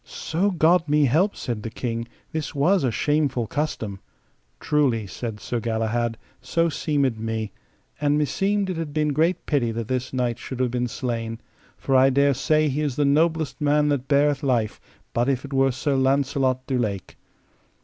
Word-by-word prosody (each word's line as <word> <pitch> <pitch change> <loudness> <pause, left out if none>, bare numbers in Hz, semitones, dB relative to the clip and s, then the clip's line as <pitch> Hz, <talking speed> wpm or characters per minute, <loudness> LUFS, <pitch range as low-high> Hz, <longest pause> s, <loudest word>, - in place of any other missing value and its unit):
So 180 +6 -1
God 170 -2 +3
me 150 0 +4
help, 165 - +2
said 115 -4 -4
the 115 - -5
King, 115 0 -4 0.2
this 155 -3 -4
was 170 +6 +3
a 130 - +2
shameful 140 +1 0
custom. 110 -8 -3 0.6
Truly, 135 -8 +1
said 110 +2 -6
Sir 120 +3 -3
Galahad, 115 +1 -1 0.2
so 165 +6 +1
seemed 140 -7 0
me; 110 -2 -3 0.5
and 145 0 +2
meseemed 195 +6 0
it 175 - -4
had 160 -3 -4
been 150 -1 +2
great 165 +5 +1
pity 130 -6 +1
that 115 -1 -4
this 130 0 -2
knight 125 -2 -1
should 130 - -7
have 125 -2 +1
been 125 0 -1
slain, 115 -2 -3 0.4
for 135 - 0
I 130 +1 +6
dare 140 +1 +3
say 155 +4 +2
he 145 +1 -1
is 145 -4 -1
the 145 - +2
noblest 155 0 +1
man 150 0 +3
that 140 -2 -1
beareth 145 -1 +3
life, 120 -6 0 0.3
but 120 +3 +1
if 130 0 -1
it 140 - -8
were 135 0 +3
Sir 140 +3 -1
Launcelot 130 -1 +1
du 130 -2 -1
Lake. 100 -5 -3
135 Hz, 180 wpm, -24 LUFS, 120-150 Hz, 0.6 s, I